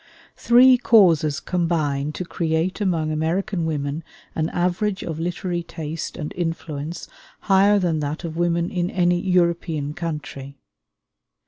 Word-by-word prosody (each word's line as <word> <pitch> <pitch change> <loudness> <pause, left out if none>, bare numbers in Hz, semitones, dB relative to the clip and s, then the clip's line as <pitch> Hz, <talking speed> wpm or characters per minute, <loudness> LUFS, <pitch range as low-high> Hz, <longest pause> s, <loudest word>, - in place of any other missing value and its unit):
Three 250 +1 +6
causes 165 - +4
combine 155 -6 -1
to 180 - -5
create 165 +3 -1
among 165 -6 0
American 165 +3 -1
women 145 0 -3 0.3
an 160 0 -1
average 185 +3 -1
of 160 -2 -5
literary 175 +1 -2
taste 160 -1 -6
and 150 -3 -5
influence 165 -2 -4 0.3
higher 200 +1 +4
than 175 -5 0
that 150 +3 -4
of 165 -2 -5
women 170 0 0
in 175 -1 -1
any 175 -2 +2
European 170 -5 0
country. 150 -4 -6
170 Hz, 125 wpm, -22 LUFS, 155-180 Hz, 0.3 s, Three